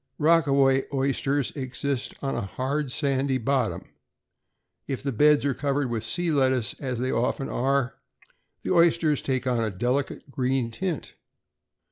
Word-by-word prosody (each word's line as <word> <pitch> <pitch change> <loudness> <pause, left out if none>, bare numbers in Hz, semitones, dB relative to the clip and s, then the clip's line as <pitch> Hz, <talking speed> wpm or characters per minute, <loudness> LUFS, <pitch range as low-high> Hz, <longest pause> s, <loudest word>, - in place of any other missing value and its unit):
Rockaway 140 -4 +3
oysters 135 0 0
exist 135 -1 -3
on 135 - -1
a - - -1
hard 130 +7 -2
sandy 135 -1 +1
bottom. 130 -1 0 1.0
If 135 -1 -4
the 140 - -1
beds 150 +4 +4
are 140 - +2
covered 140 -1 -1
with 115 -2 -2
sea 165 +10 0
lettuce, 130 -5 +2
as 130 -3 -3
they 130 +2 -1
often 125 +3 -1
are, 135 0 0 0.7
the - - -2
oysters 170 -3 +3
take 130 -1 -1
on 120 -3 +1
a 110 - 0
delicate 125 +8 -2
green 130 -2 0
tint. 175 +5 -4
135 Hz, 140 wpm, -26 LUFS, 125-145 Hz, 1.0 s, beds